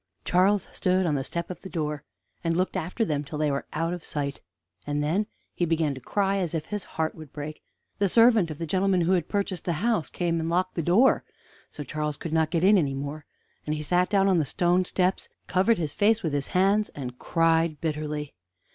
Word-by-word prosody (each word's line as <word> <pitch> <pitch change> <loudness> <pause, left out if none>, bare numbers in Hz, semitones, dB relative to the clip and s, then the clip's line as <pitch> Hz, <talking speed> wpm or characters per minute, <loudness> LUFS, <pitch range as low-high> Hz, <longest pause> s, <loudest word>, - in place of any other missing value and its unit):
Charles 190 +2 +3
stood 185 0 +1
on 160 - +1
the 135 -2 0
step 170 +5 -4
of 180 - -8
the 190 - -8
door, 150 -4 -3 0.4
and 165 0 0
looked 185 +1 0
after 185 +8 -1
them 150 -5 -1
till 150 +1 -6
they 150 -1 +1
were 140 - -3
out 165 +2 -1
of 175 -2 -6
sight; 140 -2 -4 0.5
and 145 0 0
then 185 +8 0 0.3
he - - -2
began 160 -3 +1
to 130 - -9
cry 195 - 0
as 175 -4 -1
if 155 -1 -2
his 210 -2 -4
heart 160 0 0
would 155 -3 -12
break. 150 +1 -7 0.4
The 200 -1 +2
servant 225 -4 +5
of 155 - -6
the 165 - -3
gentleman 185 +2 +2
who 170 +2 +2
had 175 -3 +1
purchased 200 -4 -2
the 175 - 0
house 215 +1 0
came 170 -2 -1
and 165 0 -2
locked 185 +2 0
the 170 - -1
door, 195 - +4 0.5
so 150 - -7
Charles 150 +1 -3
could 165 - -5
not 160 -1 +2
get 165 +1 0
in 200 +1 +6
any 140 -5 0
more, 145 +2 -5 0.4
and 150 - 0
he 150 - -4
sat 180 +4 +2
down 195 -1 +3
on 185 -3 +4
the - - +2
stone 175 +5 +1
steps, 185 +1 0
and - - -45
covered 195 +5 +3
his 155 -4 -2
face 220 +2 +3
with 160 -4 -1
his 140 -1 0
hands, 200 +3 +2
and 125 -3 -6
cried 165 -2 +2
bitterly. 150 -2 -3
165 Hz, 225 wpm, -26 LUFS, 150-185 Hz, 0.5 s, in